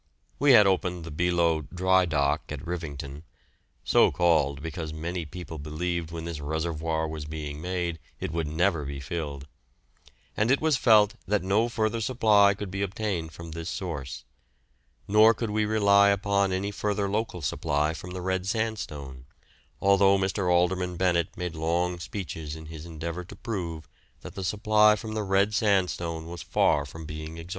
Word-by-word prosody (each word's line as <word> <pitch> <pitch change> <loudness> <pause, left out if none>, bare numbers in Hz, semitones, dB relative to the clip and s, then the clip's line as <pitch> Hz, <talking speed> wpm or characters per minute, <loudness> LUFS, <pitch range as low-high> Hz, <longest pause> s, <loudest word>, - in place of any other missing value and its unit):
We 140 -1 +6
had 105 -4 +8
opened 90 -2 0
the 80 - -7
Beloe 85 0 +1
"dry 95 +1 +3
dock" 75 -1 0
at 75 -1 -6
Rivington 75 -5 -5 0.6
(so - - +5
called 75 -4 +2
because 80 -1 -5
many 85 +2 -4
people 80 0 -8
believed 80 +3 -3
when 80 -1 -6
this 85 -3 -5
reservoir 80 +1 -2
was 80 -1 -6
being 75 -1 -6
made 90 -1 -2 0.2
it - - -3
would 80 -1 -2
never 80 +1 +1
be 70 0 -5
filled), 70 -1 -5 0.9
and 110 +2 +1
it 135 - +4
was 155 -2 +2
felt 110 -4 +5
that 105 -1 +1
no 105 +5 +2
further 115 0 -1
supply 105 -4 +4
could 100 -2 -6
be 95 +1 -3
obtained 95 -4 -2
from 85 0 -9
this 85 +2 -5
source; 75 -10 -5 0.8
nor 110 +2 +6
could 115 -1 -3
we 105 0 +1
rely 100 -2 +5
upon 100 -1 +1
any 95 +2 -1
further 105 0 -1
local 100 -4 -2
supply 75 +3 0
from 90 +2 -8
the 90 0 -6
red 95 0 -1
sandstone, 75 - -3 0.5
although 100 0 +5
Mr. 95 -1 0
Alderman 90 0 +1
Bennett 85 -2 +1
made 90 -2 -3
long 85 +2 -1
speeches 80 -5 -6
in 80 0 -10
his 80 +1 -9
endeavour 85 +2 -5
to 85 - -12
prove 85 -8 -5 0.3
that - - -9
the 95 - -5
supply 105 +2 +4
from 110 0 -6
the 110 - -1
red 100 +1 +2
sandstone 90 -6 0
was 85 0 -7
far 70 0 +2
from 80 +3 -9
being 80 +1 -7
exhausted. 85 +1 -9
90 Hz, 165 wpm, -27 LUFS, 80-100 Hz, 0.9 s, had